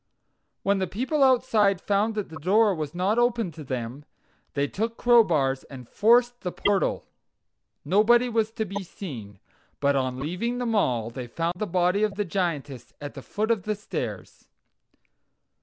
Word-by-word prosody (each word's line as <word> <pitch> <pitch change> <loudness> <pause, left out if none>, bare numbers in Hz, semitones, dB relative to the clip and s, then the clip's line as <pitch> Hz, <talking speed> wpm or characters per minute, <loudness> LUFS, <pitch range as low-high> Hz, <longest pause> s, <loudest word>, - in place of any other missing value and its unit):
When 200 0 +2
the 190 - 0
people 260 - -1
outside 225 -7 +3
found 205 +3 0
that 210 -2 -3
the 160 0 -9
door 205 +5 +3
was 155 -2 -5
not 195 +6 +1
opened 235 -7 +1
to 155 - -9
them, 130 +1 -5 0.5
they 140 0 +1
took 225 +8 -3
crowbars 160 - +3
and 125 -3 -11
forced 240 - +3
the 180 - -3
portal. 200 +1 0 0.8
Nobody 220 +9 +4
was 225 -2 +1
to 220 -2 -2
be 200 0 -5
seen, 120 - -8 0.4
but 140 0 +2
on 130 -1 -1
leaving 180 - -2
the 245 - -2
mall 125 - 0
they 125 0 -6
found 165 +7 -2
the 215 - -2
body 180 +2 +1
of 210 -2 +1
the 205 0 -1
Giantess 150 - -3
at 145 -1 -7
the 135 - -8
foot 215 - -2
of 225 -4 +1
the 215 +3 -2
stairs. 205 - -6
195 Hz, 165 wpm, -26 LUFS, 145-220 Hz, 0.8 s, Nobody